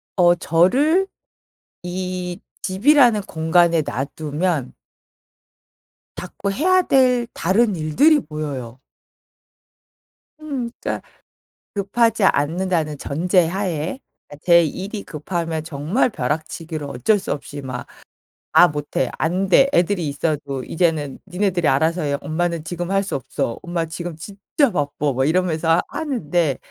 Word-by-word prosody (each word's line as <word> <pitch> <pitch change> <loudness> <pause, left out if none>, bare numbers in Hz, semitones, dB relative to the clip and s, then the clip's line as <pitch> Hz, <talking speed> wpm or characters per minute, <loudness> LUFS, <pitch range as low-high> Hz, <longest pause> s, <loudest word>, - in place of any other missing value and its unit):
어 175 -2 +5
저를 260 - +3 0.8
이 180 0 -4 0.2
집이라는 235 +2 +4
공간에 165 -1 +2
놔두면 150 +1 -2 1.4
자꾸 200 - -4
해야 370 - +3
될 250 -6 +3
다른 200 +4 +2
일들이 180 - +4
보여요. 140 - -6 1.6
흠 275 -6 -4
그러니까 - - -3 0.7
'급하지 215 +2 +1
않는다.'는 160 -1 +1
전제 175 +6 +1
하에 180 - -2 0.3
그러니까 145 - -12
제 170 -1 +6
일이 195 +7 -5
급하면 165 0 -4
정말 160 - 0
벼락치기로 155 - -4
어쩔 140 - +1
수 - - -5
없이 145 0 -7
막 130 -2 -6 0.6
"아 175 - +7
못해. 145 -3 -2
안 180 +4 0
돼.' 270 +9 +6
애들이 175 -1 +2
있어도 145 -2 -2
"이제는 160 -4 -1
니네들이 180 -3 0
알아서 160 +6 +2
해. 140 -1 0
엄마는 170 +1 -2
지금 175 +2 -4
할 195 0 +2
수 195 - -4
없어. 120 -3 -3
엄마 170 -2 -2
지금 170 +1 -6
진짜 200 - -1
바빠." 145 -2 -1
막 130 +1 +1
이러면서 165 0 +2
하는데 175 - -1
170 Hz, 255 characters per minute, -21 LUFS, 150-195 Hz, 1.6 s, 아